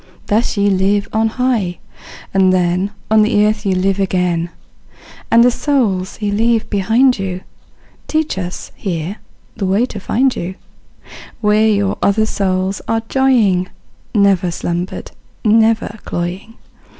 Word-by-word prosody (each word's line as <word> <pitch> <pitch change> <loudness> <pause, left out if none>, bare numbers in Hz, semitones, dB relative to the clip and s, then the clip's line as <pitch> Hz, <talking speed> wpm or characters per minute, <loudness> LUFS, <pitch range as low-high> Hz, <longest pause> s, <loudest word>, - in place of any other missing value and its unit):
Thus 220 +1 0
ye 200 0 +2
live 195 +2 +1
on 220 +1 +2
high, 225 -7 -1 0.6
and 190 -1 +4
then 180 +1 +1 0.2
On 220 0 +6
the 210 -1 +3
earth 210 0 -1
ye 190 - +2
live 195 +1 0
again; 180 -3 0 0.8
And 230 +1 +6
the 245 - +5
souls 225 -11 -1
ye 205 -1 -1
left 225 +2 +1
behind 225 +5 +3
you 185 -1 -3 0.7
Teach 315 0 -1
us, 180 -1 -6
here, 175 +1 -4 0.4
the 200 -4 -2
way 200 +6 +2
to 220 -5 -7
find 255 +7 +1
you, 180 +2 -5 0.8
Where 215 0 +3
your 200 -2 +1
other 215 +2 +2
souls 190 -2 -1
are 225 0 0
joying, 225 -9 +2 0.5
Never 195 -3 +3
slumber'd, 175 +1 -4 0.3
never 220 0 +2
cloying. 180 +6 -5
200 Hz, 135 wpm, -17 LUFS, 185-225 Hz, 0.8 s, On